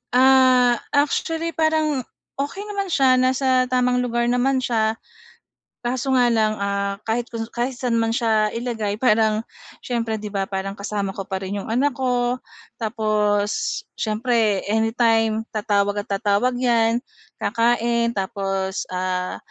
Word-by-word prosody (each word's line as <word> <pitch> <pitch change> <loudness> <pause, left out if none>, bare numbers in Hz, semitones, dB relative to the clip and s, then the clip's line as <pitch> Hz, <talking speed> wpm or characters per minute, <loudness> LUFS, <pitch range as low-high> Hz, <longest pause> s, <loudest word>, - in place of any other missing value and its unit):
Ah, 255 -2 +5 0.2
actually 325 +3 0
parang 315 -3 +1 0.4
okey 290 +8 -3
naman 405 -2 -3
siya 265 -6 +3
nasa 255 0 +2
tamang 250 0 +2
lugar 240 -1 0
naman 255 +1 +1
siya, 220 -2 +1 0.9
kaso 260 +2 0
nga 245 -1 +4
lang, 215 -1 +2
ah, 200 0 -1
kahit 230 +2 -1
kung 230 -1 -4
kahit 250 +2 -2
saan 240 -2 0
man 225 0 0
siya 220 -3 +2
ilagay 225 -4 -2
parang 220 -1 +2 0.4
siyempre 230 -3 -2
'di 210 -1 -6
ba, 195 -1 -2
parang 195 0 -3
kasama 200 -1 -2
ko 195 -1 -7
pa 190 0 -4
rin 200 +2 -3
yung - - -7
anak 255 +6 +1
ko, 250 -1 0 0.4
tapos 215 -2 0 0.2
siyempre 220 -2 +1
anytime 225 0 +2
tatawag 205 -1 0
at - - -17
tatawag 205 +4 +1
'yan, 235 -1 +2 0.3
kakain 235 +1 +1
tapos, 195 -1 -2
ah, 185 0 -2
230 Hz, 135 wpm, -22 LUFS, 210-250 Hz, 0.9 s, Ah